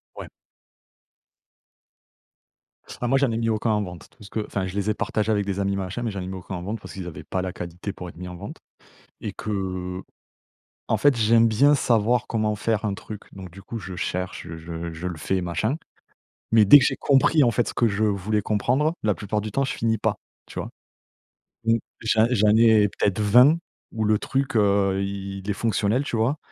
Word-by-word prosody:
Ouais. - - -8 2.7
Ah 120 - 0
moi 135 +2 +3
j'en 140 -3 +2
ai 115 - -1
mis 115 0 0
aucun 110 +1 0
en 105 -1 +1
vente. 90 -3 -9
Tout - - -18
ce 100 - -12
que 110 - -2
enfin 95 -2 -2
je 90 - -6
les 100 +1 -1
ai - - +2
partagés 110 +1 -1
avec 100 -2 +1
des 100 0 -2
amis 100 0 0
machin, 95 +5 -4
mais 115 - -1
j'en 100 - -5
ai - - -5
mis 95 - -5
aucun 95 0 -6
en 90 - -6
vente 105 +3 -4
parce - - -10
qu'ils 95 -2 -6
avaient 80 - -8
pas 95 - -2
la 90 - -4
qualité 90 +3 -6
pour 90 -1 -8
être 85 - -14
mis 90 0 -7
en 90 - -7
vente - - -8 0.6
et - - -4
que 95 -3 -4 0.9
en - - +1
fait 145 -4 +3
j'aime 115 +1 +4
bien 140 +7 +4
savoir 120 -2 +2
comment 110 -2 0
faire 110 0 -1
un 100 -2 0
truc, 105 +1 -9
donc 95 -2 -9
du 95 +3 -12
coup 115 - -6
je 90 -1 -7
cherche, 90 -1 -3
je 80 - -7
je 85 0 -6
je 80 +3 -6
le 85 - -6
fais 95 +5 -1
machin. 90 - -1 0.8
Mais 110 -2 +7
dès 145 +9 +10
que 125 - +2
j'ai - - +1
compris 145 +3 +4
en 120 - +4
fait, 120 +1 0
ce - - -6
que 115 - +3
je 105 +2 0
voulais 105 +1 0
comprendre, 130 - +1
la 105 -2 +2
plupart 105 +1 -2
du 105 0 -5
temps 135 +3 +1
je 135 - -2
finis 110 -1 0
pas, - - 0 0.3
tu - - -6
vois? - - -6 0.9
Mmh. 115 0 +4 0.2
J'en 110 0 +3
j'en 105 -3 +4
ai 110 -3 +5
peut-être 100 +1 +1
20 125 +9 +6 0.4
où 110 -1 -2
le 105 0 +3
truc, 135 -2 -1
heu, 100 -2 +2
il 100 0 -4
il 95 +2 -10
est - - +3
fonctionnel, 115 +4 0
tu 120 - -3
vois? 125 +7 +1
105 Hz, 220 wpm, -24 LUFS, 95-115 Hz, 2.7 s, dès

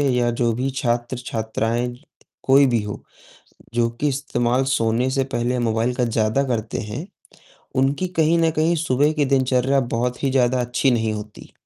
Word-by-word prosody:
या 120 -1 +2
जो 120 -1 +3
भी 130 +4 -1
छात्र-छात्राएँ 120 -1 -2 0.5
कोई 135 +1 +5
भी 120 -3 +1
हो। 105 - -6 0.7
जो 115 -1 +2
कि 150 - +1
इस्तेमाल 130 -2 0
सोने 120 -1 +1
से 135 0 +1
पहले 120 +1 0
मोबाइल 115 +1 0
का 125 - 0
ज़्यादा 110 +4 +1
करते 115 -4 -2
हैं, 115 - -6 0.7
उनकी 140 +7 +1
कहीं 160 +1 +4
न 165 -1 +3
कहीं 160 +2 +1
सुबह 150 -1 +2
की 150 -2 +1
दिनचर्या 130 0 +2
बहुत 125 +3 -2
ही 135 - +2
ज़्यादा 125 -1 +2
अच्छी 125 +2 +1
नहीं 110 -2 0
होती। 105 0 -9
125 Hz, 160 wpm, -22 LUFS, 115-135 Hz, 0.7 s, कोई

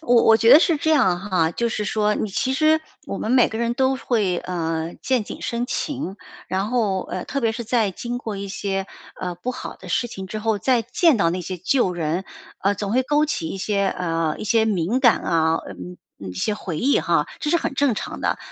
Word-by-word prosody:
我 245 -7 +4
我 225 - +7
觉 230 +1 +4
得 295 - +11
是 335 -2 +2
这 315 - 0
样 190 - +4
哈， 185 -5 +1
就 235 +7 -1
是 210 -2 -2
说 210 0 +1
你 215 - -2
其 260 +7 0
实 310 +2 +3 0.3
我 195 - -4
们 220 - -3
每 250 -1 +5
个 220 - -5
人 235 0 0
都 265 0 +2
会， 210 -9 0
呃， 165 -2 -3
见 255 -5 +1
景 - - -8
生 235 +1 -2
情， 265 - -3 0.3
然 190 +3 -1
后， 215 -6 0
呃， 185 - -5
特 275 - -2
别 225 -1 +1
是 235 0 -5
在 225 -3 +1
经 240 +6 -5
过 220 -4 -5
一 200 0 -5
些， 195 -1 -3 0.3
呃， 180 -1 -3
不 180 +9 -4
好 255 - -7
的 - - -12
事 240 - 0
情 190 -3 -7
之 215 +3 -5
后， 215 -1 0
再 250 +3 +2
见 335 - +3
到 165 - +3
那 180 +1 -2
些 185 +1 -5
旧 185 +1 +1
人， 170 +2 -2 0.4
呃， 200 +1 +2
总 205 +1 -3
会 260 +2 +3
勾 295 +3 +2
起 165 - -2
一 - - -5
些， 200 0 0
呃， 165 -4 -1
一 - - -5
些 225 +1 +3
敏 205 +3 0
感 240 -4 +5
啊， 160 -1 +2
呃， - - -7 0.4
一 95 -2 -7
些 205 - -1
回 175 -6 -5
忆 275 +3 +3
哈， - - +1
这 300 - -2
是 340 - +4
很 275 - -3
正 275 -4 +2
常 - - -5
的。 - - 0
215 Hz, 250 characters per minute, -22 LUFS, 185-250 Hz, 0.4 s, 得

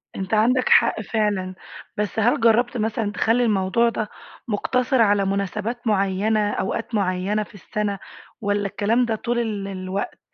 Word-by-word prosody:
أنت 190 +2 -4
عندك 245 +4 +3
حق - - +4
فعلًا، 205 -4 -1 0.4
بس 210 +1 -2
هل 230 +3 +3
جرّبت 235 +2 +3
مثلًا 220 -1 -1
تخلّي 230 +4 +2
الموضوع 215 +2 +2
ده 220 -2 -3 0.4
مُقتصِر 250 +3 +1
على 205 -2 +3
مناسبات 210 +5 -2
معيّنة، 205 +1 +1
أوقات 225 +4 -3
معيّنة 195 +2 0
في - - -17
السَنة 200 0 -3 0.4
والّا 205 -1 0
الكلام 225 +5 +1
ده 225 -2 -1
طول 240 +2 -2
ال 210 -4 -2
الوقت؟ 190 0 -4
210 Hz, 145 wpm, -23 LUFS, 200-230 Hz, 0.4 s, حق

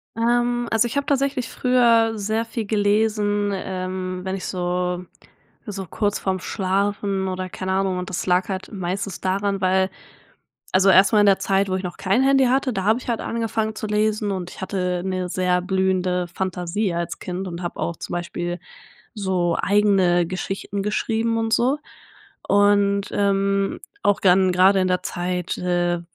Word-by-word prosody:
Ähm, 240 +1 +1
also, 225 +1 +3
ich 240 - -4
habe 280 - 0
tatsächlich 275 -3 0
früher 230 -3 +3
sehr 215 +2 -1
viel 225 -1 -4
gelesen, 205 0 +1
ähm, 185 -1 -4
wenn 190 0 -2
ich 195 - -6
so 180 0 -2 0.6
so 195 -2 -5
kurz 205 +4 -1
vorm 190 -1 -1
Schlafen 195 0 -1
oder, 185 0 -3
keine 185 +1 -4
Ahnung 190 -1 0
und 180 - -5
das 185 - -3
lag 180 +1 +2
halt 190 -1 -4
meistens 190 0 -4
daran, 195 +1 -1
weil 190 0 +2 0.8
also, 190 +1 +5
erst 190 +1 +6
mal 210 - +6
in - - +5
der 195 -1 +4
Zeit, 195 0 +1
wo 185 - 0
ich 190 - -3
noch 180 -1 -5
kein 200 +7 +2
Handy 270 0 +4
hatte, 260 +1 +2
da 190 - -2
habe 220 +2 +4
ich - - -13
halt 230 - 0
angefangen 225 -1 -2
zu 215 - -4
lesen 210 0 0
und 185 -2 -4
ich - - -11
hatte 180 -2 -2
'ne 185 -1 -2
sehr 180 0 +1
blühende 185 -1 0
Fantasie 185 +1 -2
als 170 0 -3
Kind 185 +1 -5
und 170 0 -6
habe 175 - -5
auch 170 - -2
zum - - -7
Beispiel 175 0 -3 0.6
so 185 -4 0
eigene 195 -4 +3
Geschichten 195 +2 -4
geschrieben 225 +2 0
und 225 0 -1
so. 255 +6 +2 0.7
Und, 200 0 +3
ähm, 195 0 +1 0.2
auch 205 - +3
dann 185 0 +4
grade 190 +2 +5
in 185 - +1
der 180 0 0
Zeit, 180 0 -3
äh, 175 -1 0
195 Hz, 170 wpm, -22 LUFS, 185-210 Hz, 0.8 s, erst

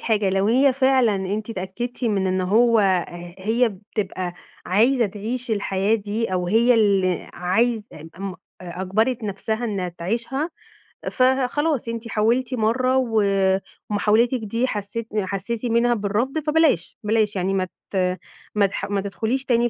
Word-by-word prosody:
حاجة، 210 -4 +1
لو 195 +1 +1
هي 260 +5 +4
فعلًا 260 -4 +3
أنتِ 205 +4 -3
اتأكّدتِ 230 +6 -5
من 200 -4 +1
إن 185 0 0
هو 225 +5 +4 0.3
ه 175 0 -9
هي 225 +5 +2 0.2
بتبقى 185 -3 -3 0.3
عايزة 230 +5 +3
تعيش 230 +5 -5
الحياة 200 0 +1
دي 215 0 -2
أو 180 -1 0
هي 230 +6 +4
اللي 195 -5 +2
عايزة 220 +6 +1
ام 175 +5 -7
أ - - -15 0.5
أجبَرِت 220 +6 0
نفسها 220 +3 -2
إنّها 195 -5 -2
تعيشها 235 - -3 0.6
فخلاص، 265 +2 +1
أنتِ 230 0 -4
حاولتِ 235 +4 +1
مرّة 255 +3 +2 0.9
ومحاولتِك 220 +4 +2
دي 230 +3 -1
حسّيتِ 215 +1 -4
حسّيتِ 205 +4 -3
منها 235 +1 +3
بالرفض، 230 +7 -1
فبلاش، 300 - +1
بلاش، 215 -1 +1
يعني 190 +1 0
ما 185 -1 0 0.2
ت - - -6 0.6
ما 205 -1 +4
تح 195 - -3
ما 200 -1 0
تدخُليش 225 +7 -2
تاني 240 -1 +2
220 Hz, 140 wpm, -23 LUFS, 195-240 Hz, 0.9 s, هي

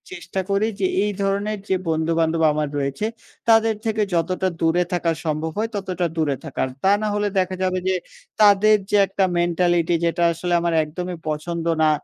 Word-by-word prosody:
চেষ্টা 190 - -4
করি 200 +2 +2
যে, 375 - +2 0.2
এই 210 - 0
ধরনের 200 +2 -1
যে 190 - +3
বন্ধু-বান্ধব 160 0 +1
আমার 150 0 -1
রয়েছে, 140 +7 -2 0.4
তাদের 225 0 +5
থেকে 220 -1 0
যতটা 185 +3 0
দূরে 165 +2 +3
থাকা 175 -1 +1
সম্ভব 155 +1 -1
হয়, 220 +2 -1
ততটা 185 -3 -2
দূরে 150 -3 +1
থাকার। 140 -3 -2 0.2
তা 195 - +4
না 215 - 0
হলে 205 0 0
দেখা 185 0 -1
যাবে 185 0 0
যে, 190 - +2 0.5
তাদের 210 +1 +6
যে 210 - +3
একটা 195 +1 0 0.2
মেন্টালিটি 175 0 +2
যেটা 170 +1 0
আসলে 175 +2 -3
আমার 170 0 0
একদমই 180 +3 -5
পছন্দ 165 +2 -3 0.2
না, 155 - +5
180 Hz, 175 wpm, -22 LUFS, 165-200 Hz, 0.5 s, তাদের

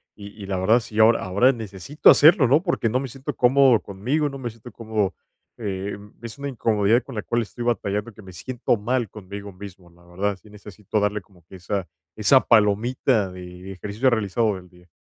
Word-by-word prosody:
y 100 -1 -10
y 100 - -6
la 95 -1 -3
verdad, 110 +6 +3
sí, 110 -1 -10
ahora 115 +1 +5
ahora 100 +8 +3
necesito 110 - +1
hacerlo, 155 -2 +6
¿no?, 145 +7 +3
porque 170 - 0
no 125 +3 0
me 135 - -4
siento 135 +2 -6
cómodo 125 -2 +4
conmigo, 130 +10 -2
no 135 - -8
me 120 -3 -5
siento 115 +1 -13
cómodo, 110 -4 -2 0.4
em, 100 -1 -5
es 115 +3 -8
una 140 - -5
incomodidad 115 -2 +1
con 135 - -10
la 105 - -2
cual 120 0 -1
estoy 120 +2 -7
batallando, 105 -1 -2
que 110 - -14
me 95 -2 -13
siento 120 +4 -2
mal 120 0 -1
conmigo 100 0 -9
mismo, 95 -2 -12
la 85 +1 -23
verdad. 95 +3 -2
Sí 105 - -18
necesito 105 0 -5
darle 105 0 -1
como 90 -2 -24
que 95 - -14
esa 95 0 -4 0.3
esa 120 +5 +5
palomita 110 0 +2
de 90 - -10 0.2
de 95 - -8
ejercicio 105 +7 0
realizado 110 -1 0
del 90 -1 -11
día. 90 0 -21
105 Hz, 205 wpm, -23 LUFS, 100-120 Hz, 0.4 s, hacerlo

